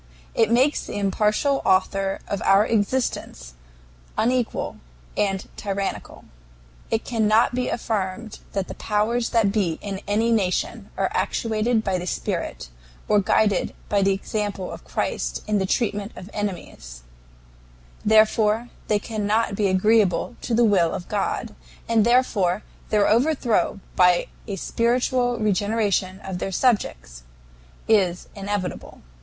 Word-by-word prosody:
It 225 -2 +3
makes 255 +6 +3
the - - -5
impartial 210 +7 +1
Author 195 +1 +1
of 200 - -3
our 195 +2 +5
existence 205 - -1 0.6
unequal 245 0 0 0.4
and 195 -1 0
tyrannical. 200 -1 -4 0.6
It 225 0 0
cannot 225 0 +3
be 250 0 -1
affirmed 215 -1 -3
that 195 -2 -1
the - - -6
powers 225 +3 0
that 220 -4 +2
be 190 -7 0
in 195 -1 -5
any 220 +3 +2
nation 195 -5 0
are - - 0
actuated 225 0 0
by 190 -3 0
the 180 - -6
spirit - - -3 0.4
or 210 - +4
guided 205 +1 +1
by 200 -1 +2
the 195 0 +3
example 195 -1 -3
of - - -9
Christ - - -3
in 210 -1 +1
the 190 - -1
treatment 205 -1 -1
of 185 +3 -10
enemies; 120 - -6 1.0
therefore 220 +1 +3 0.2
they 210 - +3
cannot 215 +1 -1
be 205 0 +1
agreeable 205 +2 +2
to 235 - -1
the 235 +1 +4
will 185 -6 +3
of 175 - -6
God, - - -2 0.3
and 225 -2 +3
therefore 215 -6 +2 0.3
their 210 -2 +3
overthrow 240 -3 +2 0.2
by 180 -1 +4 0.2
a 200 - -3
spiritual 245 +4 +1
regeneration 205 -2 0
of 185 -2 -5
their 195 - -3
subjects 195 - 0 0.7
is 190 -5 +2
inevitable. 200 -2 -5
210 Hz, 130 wpm, -23 LUFS, 195-225 Hz, 1.0 s, our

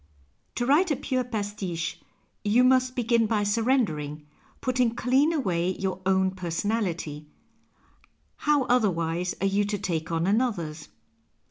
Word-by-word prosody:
To 240 - -1
write 305 +8 +4
a 295 - +2
pure 260 -1 -1
pastiche 205 -7 -4 0.4
you 225 +4 +4
must 255 0 +3
begin 235 -2 +2
by 210 -2 +1
surrendering, 205 - 0 0.3
putting 250 -2 +1
clean 265 +6 +3
away 185 - 0
your 190 -1 -3
own 190 0 +3
personality 175 -4 -3 0.6
— - - -33 0.3
how 295 -2 +2
otherwise 180 -8 0
are - - +1
you 200 +1 +2
to 205 0 -2
take 165 -4 -3
on 165 0 0
another's 185 -8 -1
205 Hz, 130 wpm, -26 LUFS, 175-250 Hz, 0.6 s, write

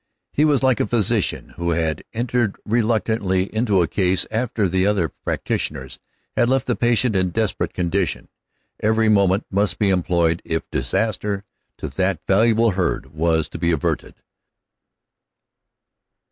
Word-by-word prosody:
He 150 - +2
was 145 -3 +2
like 130 -3 +3
a - - +1
physician 110 -3 0
who 85 0 -2
had 80 -2 -1
entered 120 -2 -1
reluctantly 110 -4 0
into 110 -5 +2
a - - -1
case 95 +1 +1
after 115 -1 -1
other 95 -1 +1
practitioners 65 -3 -4 0.4
had 120 - +2
left 135 -1 +1
the - - 0
patient 120 -1 +2
in 95 -1 +2
desperate 110 +3 -1
condition. 90 +1 -1 0.5
Every 110 +1 +2
moment 100 -1 +3
must 100 -3 +1
be 100 -2 +2
employed 85 -2 +1
if 80 0 -3
disaster 105 -3 -1 0.3
to - - -5
that 95 -3 -1
valuable 115 +3 +3
herd 90 -7 -2
was 80 -1 +1
to - - -8
be 85 - +1
averted. 80 -4 -2
100 Hz, 135 wpm, -21 LUFS, 85-110 Hz, 0.5 s, like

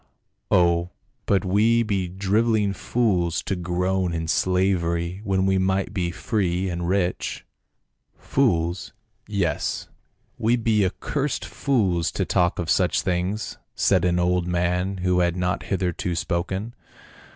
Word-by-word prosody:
" - - -51
Oh, 85 -1 +3 0.4
but 100 0 +2
we 110 +5 +3
be 100 -4 -1
driveling 100 +2 +1
fools 95 -6 0
to 95 - -2
groan 90 0 -1
in 80 0 -3
slavery 85 +1 0
when 95 -2 +1
we 95 0 +2
might 95 +1 0
be 90 -4 -1
free 95 -1 -1
and 85 0 -3
rich." 90 -2 -1 0.4
" - - -50
Fools 85 -9 0 0.2
— 105 -1 -46
yes, 100 -6 -1 0.5
we 115 +2 +3
be 110 -3 +2
accursed 135 +9 -2
fools 95 - 0
to - - -1
talk 90 0 +1
of 85 - -3
such 90 +2 +2
things," 90 +4 -2 0.2
said 95 -4 +3
an 90 -1 +2
old 90 0 +1
man, 90 +2 0
who 90 -1 +3
had 85 -1 +2
not 90 +1 -1
hitherto 90 -2 -1
spoken. 95 +6 -2
95 Hz, 140 wpm, -24 LUFS, 85-100 Hz, 0.5 s, Oh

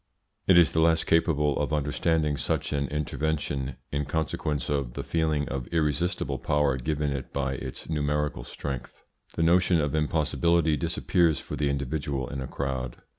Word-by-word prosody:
It 95 - +7
is 85 -4 +6
the 80 - +1
less 80 0 +4
capable 75 -3 +2
of 75 +1 -1
understanding 75 +1 +1
such 65 - -1
an 70 -1 0
intervention, 75 -2 -2 0.2
in 70 0 -1
consequence 75 -1 -2
of 70 -4 -1
the - - -3
feeling 80 -3 0
of 65 -3 -4
irresistible 85 +2 0
power 75 -2 +1
given 75 +3 -1
it 70 -2 -5
by 70 -1 -1
its 70 - -6
numerical 75 -3 -1
strength. 65 -1 -6 0.3
The 80 - +1
notion 85 +1 +4
of 75 -1 0
impossibility 80 +1 +2
disappears 85 -1 +1
for - - -6
the 75 -1 0
individual 70 -1 -2
in 70 -2 -4
a 65 - -4
crowd. 65 -3 -3
75 Hz, 160 wpm, -27 LUFS, 70-80 Hz, 0.3 s, It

